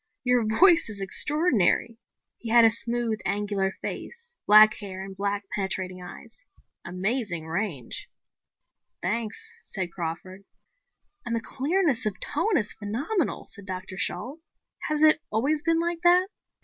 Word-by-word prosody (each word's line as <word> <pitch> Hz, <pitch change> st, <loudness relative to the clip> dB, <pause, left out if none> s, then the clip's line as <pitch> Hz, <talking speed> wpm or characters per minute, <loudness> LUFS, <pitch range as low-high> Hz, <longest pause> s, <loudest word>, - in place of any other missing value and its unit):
"Your 250 Hz, -2 st, +2 dB
voice 330 Hz, -, +6 dB
is 205 Hz, -2 st, -4 dB
extraordinary." 230 Hz, -, +1 dB, 0.4 s
He 230 Hz, -, -6 dB
had 235 Hz, 0 st, +6 dB
a 225 Hz, -, +6 dB
smooth, 235 Hz, -1 st, -2 dB
angular 200 Hz, -1 st, -1 dB
face, 475 Hz, 0 st, -7 dB
black 215 Hz, +1 st, +8 dB
hair 190 Hz, -2 st, -7 dB
and 195 Hz, 0 st, -9 dB
black, 200 Hz, +1 st, -2 dB
penetrating 185 Hz, -2 st, -3 dB
eyes. 180 Hz, -, -12 dB, 0.4 s
"Amazing 185 Hz, -1 st, -2 dB
range." 160 Hz, -, -4 dB, 0.9 s
"Thanks," 215 Hz, +3 st, -3 dB
said 185 Hz, -3 st, -4 dB
Crawford. 175 Hz, +3 st, -6 dB, 0.8 s
"And 235 Hz, -, -3 dB
the -, -, 0 dB
clearness 275 Hz, -, 0 dB
of 205 Hz, -, -4 dB
tone 435 Hz, -4 st, 0 dB
is 210 Hz, -2 st, -1 dB
phenomenal," 270 Hz, -, -3 dB
said 200 Hz, -2 st, -9 dB
Dr. 185 Hz, 0 st, -6 dB
Shalt. 265 Hz, -, -1 dB, 0.5 s
"Has 305 Hz, 0 st, +1 dB
it 310 Hz, -1 st, +7 dB
always 280 Hz, +8 st, 0 dB
been 330 Hz, +1 st, +1 dB
like 340 Hz, 0 st, -2 dB
that?" 360 Hz, +2 st, +4 dB
220 Hz, 135 wpm, -26 LUFS, 190-295 Hz, 0.9 s, black